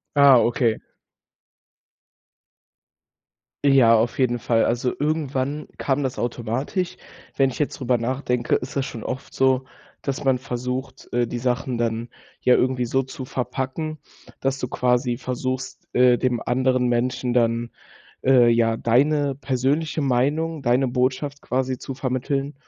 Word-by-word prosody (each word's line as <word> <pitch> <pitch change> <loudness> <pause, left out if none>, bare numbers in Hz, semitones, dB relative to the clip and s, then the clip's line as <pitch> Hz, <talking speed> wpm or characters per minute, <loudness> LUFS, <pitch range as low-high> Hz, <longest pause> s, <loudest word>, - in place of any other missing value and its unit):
Ah, 140 -3 +7
okay. 115 -1 +2 2.9
Ja, 130 -5 +6
auf 115 +4 0
jeden 120 -2 +2
Fall. 115 0 +2
Also, 120 +1 0
irgendwann 145 -1 -1
kam 140 +1 0
das 130 -2 -3
automatisch. 120 - -2 0.4
Wenn 135 -1 +3
ich - - -7
jetzt 150 - -2
drüber 125 -1 +1
nachdenke, 125 0 0
ist 125 - -4
das 135 -1 0
schon 115 - -7
oft 130 +2 -6
so, 130 0 +2 0.4
dass 140 0 -3
man 135 -2 +3
versucht, 125 +1 -5
äh, 120 0 +1
die 120 +1 -4
Sachen 125 0 -1
dann 115 0 -1 0.3
ja 125 - +5
irgendwie 125 -1 +2
so 135 +3 +1
zu 130 0 -8
verpacken, 130 +5 -3 0.4
dass 135 0 0
du 125 - -2
quasi 125 0 +1
versuchst, 130 +1 -4
äh, 125 -1 +5
dem 125 -2 0
anderen 130 +1 +1
Menschen 120 +1 0
dann, 115 -1 +1 0.5
äh, 130 -2 +6
ja, 115 -1 +2
deine 140 +5 +2
persönliche 140 +4 -1
Meinung, 145 +4 0
deine 130 +1 +2
Botschaft 130 +3 -1
quasi 130 0 -1
zu 135 - -6
vermitteln 135 +2 -2
130 Hz, 140 wpm, -23 LUFS, 120-135 Hz, 2.9 s, Ah